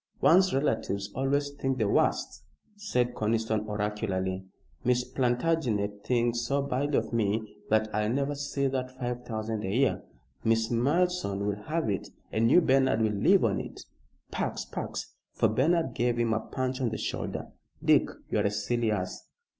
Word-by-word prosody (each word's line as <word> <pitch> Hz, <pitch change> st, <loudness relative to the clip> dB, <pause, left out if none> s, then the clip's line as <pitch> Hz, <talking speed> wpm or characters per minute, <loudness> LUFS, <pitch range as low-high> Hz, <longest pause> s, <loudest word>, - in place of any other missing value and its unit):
"One's 185 Hz, +3 st, +5 dB
relatives 110 Hz, -7 st, -1 dB
always 140 Hz, +2 st, 0 dB
think 135 Hz, -2 st, -2 dB
the 110 Hz, -4 st, +1 dB
worst," -, -, +1 dB, 0.3 s
said 125 Hz, -, 0 dB
Conniston, 110 Hz, 0 st, 0 dB
oracularly. 105 Hz, -3 st, -2 dB, 0.4 s
"Miss 125 Hz, 0 st, +2 dB
Plantagenet 120 Hz, -6 st, 0 dB
thinks 120 Hz, -1 st, +1 dB
so 140 Hz, +4 st, 0 dB
badly 140 Hz, +1 st, 0 dB
of -, -, -2 dB
me 110 Hz, -1 st, -1 dB
that 110 Hz, 0 st, +3 dB
I'll 105 Hz, 0 st, +1 dB
never 140 Hz, +4 st, 0 dB
see 140 Hz, -1 st, -2 dB
that 130 Hz, -1 st, -2 dB
five 125 Hz, -1 st, -3 dB
thousand 110 Hz, -2 st, -3 dB
a 95 Hz, -, -2 dB
year. 125 Hz, +4 st, +2 dB, 0.4 s
Miss 115 Hz, +1 st, +2 dB
Malleson 135 Hz, -, +1 dB
will 105 Hz, 0 st, -2 dB
have 165 Hz, +1 st, -1 dB
it, 100 Hz, -3 st, -2 dB, 0.2 s
and 115 Hz, +1 st, +2 dB
you, 180 Hz, -, +7 dB
Bernard, 130 Hz, -6 st, +3 dB
will 110 Hz, -, +2 dB
live 100 Hz, -, +4 dB
on -, -, +1 dB
it. -, -, -7 dB, 0.5 s
Pax! -, -, -2 dB
Pax!" -, -, -5 dB, 0.2 s
for -, -, +3 dB
Bernard 165 Hz, +5 st, +2 dB
gave 120 Hz, 0 st, +1 dB
him 115 Hz, -1 st, +2 dB
a 110 Hz, -, +1 dB
punch 130 Hz, +3 st, -3 dB
on 125 Hz, -, +1 dB
the 110 Hz, -, -4 dB
shoulder. -, -, -4 dB, 0.4 s
"Dick, -, -, +5 dB, 0.2 s
you're -, -, +2 dB
a -, -, +2 dB
silly 110 Hz, +3 st, 0 dB
ass! 95 Hz, -4 st, -3 dB
120 Hz, 160 wpm, -29 LUFS, 110-135 Hz, 0.5 s, you